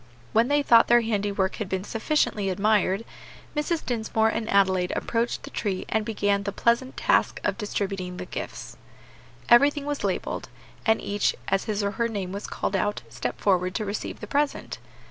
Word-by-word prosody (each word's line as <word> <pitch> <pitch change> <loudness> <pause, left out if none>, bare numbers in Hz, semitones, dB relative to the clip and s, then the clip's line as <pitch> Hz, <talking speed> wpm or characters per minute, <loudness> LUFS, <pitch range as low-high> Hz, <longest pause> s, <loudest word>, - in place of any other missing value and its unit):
When 230 +2 +4
they 290 +1 +2
thought 230 -4 +6
their 240 0 +6
handiwork 205 -3 -1
had 210 -4 -4
been 190 0 -2
sufficiently 220 -3 0
admired, 200 +1 +2 0.5
Mrs. 305 +2 -1
Dinsmore 220 -2 +1
and 225 0 -3
Adelaide 190 -2 +3
approached 235 +1 -1
the - - -9
tree 195 -4 -2
and 220 - +1
began 205 -2 0
the 200 0 -3
pleasant 235 +5 +1
task - - +2
of - - 0
distributing 195 -4 -3
the 180 - -5
gifts. - - -7 0.7
Everything 280 +4 +5
was 290 -1 -3
labelled, - - -2 0.4
and 220 - +4
each, 205 0 0
as 195 0 +1
his 210 -1 -1
or 200 - 0
her 230 +3 0
name 200 -5 -4
was 200 +1 -5
called 195 - -2
out, 205 - -1
stepped 125 +1 -4
forward 185 -2 +2
to 215 - -1
receive 205 +1 -4
the - - -4
present. 290 0 -1
210 Hz, 175 wpm, -26 LUFS, 195-235 Hz, 0.7 s, thought